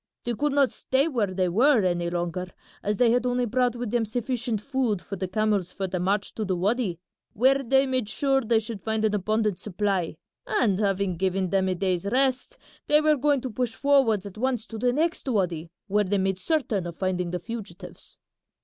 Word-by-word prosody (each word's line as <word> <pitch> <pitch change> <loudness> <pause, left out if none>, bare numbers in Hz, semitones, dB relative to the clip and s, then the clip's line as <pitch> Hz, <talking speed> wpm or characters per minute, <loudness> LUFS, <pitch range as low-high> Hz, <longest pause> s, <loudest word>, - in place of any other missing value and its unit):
They 240 - -1
could 290 +4 0
not 280 -2 +3
stay 270 +4 0
where 240 -10 0
they 185 -1 0
were 235 +6 +4
any 175 -1 0
longer 175 +1 -3 0.3
as 210 0 -1
they 235 0 +4
had 245 +1 +2
only 250 0 +1
brought 245 +1 +1
with 240 -3 -4
them 240 -1 +1
sufficient 240 0 -2
food 250 -4 -1
for 200 - -7
the 190 0 -3
camels 200 -2 0
for 195 - -4
the 185 -1 -3
march 195 +3 0
to 220 - -3
the 190 -3 -1
wady, 200 0 0 0.4
where 265 +5 +3
they 270 +2 +3
made 255 -5 -1
sure 270 +2 +1
they 230 -1 +2
should 220 -2 -4
find 220 0 0
an 215 - +1
abundant 210 -1 0
supply, 195 -4 -2 0.3
and 205 -6 +1
having 195 -3 0
given 190 0 0
them 190 -1 +2
a 185 - 0
day's 185 0 -1
rest 265 - 0 0.3
they 300 - +5
were 305 0 +4
going 285 -1 +2
to 255 - -4
push 235 0 -2
forwards 265 -8 +3
at 200 +1 -9
once 250 -3 0
to 225 - -8
the 245 +2 +2
next 320 +3 -1
wady, 175 -7 -1 0.2
where 210 +1 +2
they 200 +2 0
made 190 -1 0
certain 230 - 0
of 170 - -8
finding 180 -2 -1
the 180 - -2
fugitives." 220 +3 -9
215 Hz, 205 wpm, -26 LUFS, 190-250 Hz, 0.4 s, they